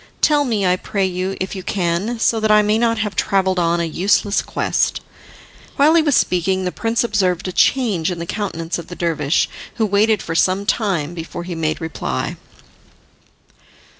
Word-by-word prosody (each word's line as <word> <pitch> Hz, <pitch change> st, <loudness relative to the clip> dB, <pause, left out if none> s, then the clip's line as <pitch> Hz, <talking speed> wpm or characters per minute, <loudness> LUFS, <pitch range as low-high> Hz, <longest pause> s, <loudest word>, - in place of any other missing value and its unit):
Tell 295 Hz, -2 st, +3 dB
me, 215 Hz, -6 st, 0 dB
I 180 Hz, 0 st, +3 dB
pray 195 Hz, +1 st, -1 dB
you, 185 Hz, +1 st, -3 dB
if 190 Hz, +2 st, -4 dB
you 190 Hz, -, -5 dB
can, 185 Hz, +5 st, -1 dB
so 225 Hz, 0 st, +2 dB
that 220 Hz, 0 st, 0 dB
I 210 Hz, 0 st, +6 dB
may 210 Hz, +1 st, +2 dB
not 230 Hz, -1 st, +1 dB
have 210 Hz, -3 st, -2 dB
travelled 190 Hz, -1 st, +1 dB
on 170 Hz, 0 st, +1 dB
a -, -, 0 dB
useless 200 Hz, +5 st, +1 dB
quest." -, -, -1 dB, 0.8 s
While 295 Hz, +3 st, +4 dB
he 335 Hz, -, +5 dB
was 295 Hz, -4 st, +2 dB
speaking, 185 Hz, +1 st, +1 dB
the 180 Hz, -, -1 dB
prince 230 Hz, +4 st, -1 dB
observed 190 Hz, -6 st, 0 dB
a -, -, -3 dB
change 200 Hz, -6 st, +2 dB
in 180 Hz, -, -3 dB
the 170 Hz, -, -5 dB
countenance 170 Hz, -4 st, -3 dB
of 170 Hz, -, -9 dB
the 175 Hz, -, -8 dB
dervish, 160 Hz, -3 st, 0 dB, 0.3 s
who 225 Hz, -, +1 dB
waited 210 Hz, +1 st, +2 dB
for 165 Hz, -, -4 dB
some 185 Hz, +4 st, +1 dB
time 180 Hz, -9 st, 0 dB
before 170 Hz, 0 st, -6 dB
he 175 Hz, 0 st, -6 dB
made 160 Hz, -2 st, -2 dB
reply. 110 Hz, -, -3 dB
190 Hz, 185 wpm, -19 LUFS, 170-215 Hz, 0.8 s, I